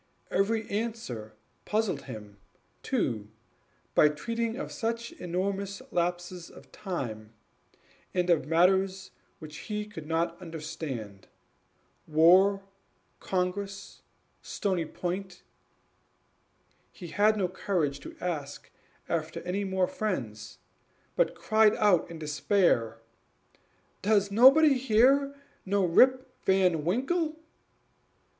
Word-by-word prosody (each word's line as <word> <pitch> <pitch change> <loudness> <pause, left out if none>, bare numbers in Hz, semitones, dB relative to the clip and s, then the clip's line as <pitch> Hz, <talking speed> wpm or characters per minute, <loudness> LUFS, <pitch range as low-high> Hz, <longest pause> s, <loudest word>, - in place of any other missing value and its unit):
Every 220 +2 +1
answer 200 - -4 0.3
puzzled 210 -9 -1
him 105 -5 -10 0.4
too, 105 -2 -1 0.6
by 150 - +6
treating 230 +10 -3
of 285 - -5
such 230 +1 -3
enormous 195 +3 -3
lapses 175 0 -2
of - - -16
time, 115 - -5 0.8
and 180 -1 0
of 160 -4 +2
matters 190 +3 +2 0.3
which 155 -1 -10
he 210 0 -2
could 165 -8 -10
not 165 +2 -1
understand: 150 - -7 0.8
war 185 +6 +5 0.6
Congress 195 +2 -3 0.4
Stony 185 -5 -2
Point; 180 +3 -5 1.5
he 175 -4 -10
had 215 +3 +3
no 190 -3 +1
courage 175 -6 -1
to - - -11
ask 150 -5 -5 0.4
after 160 -1 -2
any 185 +3 -2
more 190 -1 +1
friends, 180 - -4 0.6
but - - +1
cried 220 -1 +3
out 205 -8 +3
in 165 - -8
despair, 150 - +1 1.0
"Does 200 -1 +2
nobody 270 +5 +7
here 270 +4 +3 0.3
know 200 0 +1
Rip 255 +9 +4 0.2
Van 185 -5 +3
Winkle?" 305 - 0
185 Hz, 100 wpm, -28 LUFS, 160-210 Hz, 1.5 s, nobody